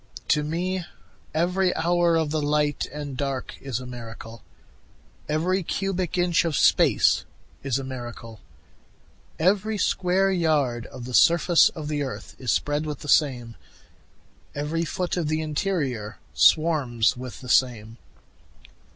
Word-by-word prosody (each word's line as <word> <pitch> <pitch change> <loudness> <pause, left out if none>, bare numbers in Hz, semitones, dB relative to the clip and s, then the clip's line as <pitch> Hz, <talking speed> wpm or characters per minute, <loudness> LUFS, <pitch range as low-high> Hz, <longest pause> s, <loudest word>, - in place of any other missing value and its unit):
To 150 - +3
me 180 +4 -2 0.5
every 180 +3 +1
hour 175 0 +2
of 160 -2 0
the 155 0 0
light 145 0 0
and 145 -1 -6
dark 135 -1 -3
is 130 -4 -3
a 130 - -8
miracle, 115 -2 -9 0.9
Every 175 +5 +1
cubic 185 0 -2
inch 175 -1 +2
of 165 -3 -1
space - - +4 0.4
is 135 -2 -1
a 135 - -4
miracle, 120 -4 -8 1.0
Every 205 +5 +1
square 190 0 +1
yard 150 -10 0
of 125 -2 -9
the 125 - -7
surface 170 +3 +5
of 155 -2 -6
the 150 -1 -2
earth 135 -2 -6
is 125 -4 -1
spread 145 +6 0
with 150 -2 -5
the 150 - -7
same, 125 -7 +2 1.0
Every 155 +4 -2
foot 180 +2 -3
of 170 -4 -1
the 155 +1 -1
interior 145 - -2 0.2
swarms 125 - +3
with 125 0 -8
the 125 - -10
same. 115 -2 +1
150 Hz, 135 wpm, -25 LUFS, 125-170 Hz, 1.0 s, surface